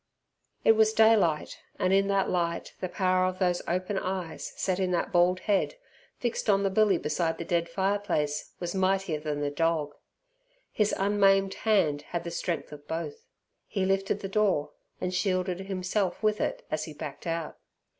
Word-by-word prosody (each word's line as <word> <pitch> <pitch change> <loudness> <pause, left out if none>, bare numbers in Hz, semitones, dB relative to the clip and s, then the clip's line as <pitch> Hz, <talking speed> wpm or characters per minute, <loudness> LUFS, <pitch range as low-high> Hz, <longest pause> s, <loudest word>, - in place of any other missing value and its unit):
It - - +7
was 220 0 +4
daylight, 220 -9 +3 0.2
and 185 +1 +1
in 195 0 +4
that 195 -1 +2
light 170 -2 -1
the 185 - -3
power 185 0 +2
of 185 0 -3
those 180 -2 +1
open 185 +3 -1
eyes 185 -3 -4
set 185 -1 0
in 185 -1 +1
that 175 - 0
bald 180 0 +3
head, 205 - +1 0.4
fixed 240 -2 -2
on 200 -1 +4
the 195 - +1
billy 205 -2 +4
beside 165 +1 -1
the 170 - -5
dead 170 0 0
fireplace, 190 -5 -1
was 175 -1 -3
mightier 190 -4 +1
than 150 -1 -3
the 145 0 -1
dog. 155 -1 0 0.8
His 210 -1 +1
unmaimed 195 -1 +3
hand 190 -10 +2
had 170 +3 -4
the 170 - -5
strength 170 0 -3
of 145 -1 -11
both. 440 - -5 0.4
He 195 -3 -1
lifted 195 +1 0
the 195 - -3
door 195 -7 +1 0.3
and 180 - -2
shielded 185 -1 0
himself 190 0 -2
with 215 0 +2
it - - -2
as 155 - -1
he 155 - -8
backed 150 +3 -7
out. 165 -1 -3
185 Hz, 175 wpm, -28 LUFS, 170-195 Hz, 0.8 s, It